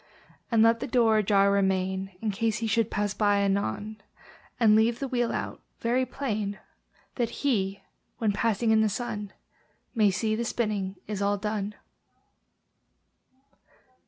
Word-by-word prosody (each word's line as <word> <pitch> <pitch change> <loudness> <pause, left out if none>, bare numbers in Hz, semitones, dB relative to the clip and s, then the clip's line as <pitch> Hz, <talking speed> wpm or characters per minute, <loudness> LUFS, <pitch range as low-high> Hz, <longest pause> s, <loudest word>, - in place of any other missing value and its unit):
And 225 -2 +4
let 230 0 +4
the 270 - -4
door 230 -3 +3
ajar 200 -1 +3
remain, 190 -1 0
In 220 -2 0
case 220 +2 0
he 230 - -3
should 225 0 +1
pass 205 -1 -1
by 205 -1 +2
anon; 200 - -1 0.6
And 220 -3 +6
leave 225 +2 +3
the 275 - -3
wheel 245 -2 0
out - - -4 0.2
very 250 +2 +1
plain, 215 -6 -3 0.6
That 240 -3 0 0.2
HE, 200 -7 0 0.3
when 220 -3 +1
passing 220 +2 +1
in 220 0 +5
the 220 - +3
sun, 210 -2 -4 0.6
May 215 -4 +4
see 215 +3 0
the 235 - -2
spinning 210 -5 -2
is 205 -1 -4
all 200 0 +1
done. 210 0 -3
215 Hz, 145 wpm, -27 LUFS, 200-230 Hz, 0.6 s, And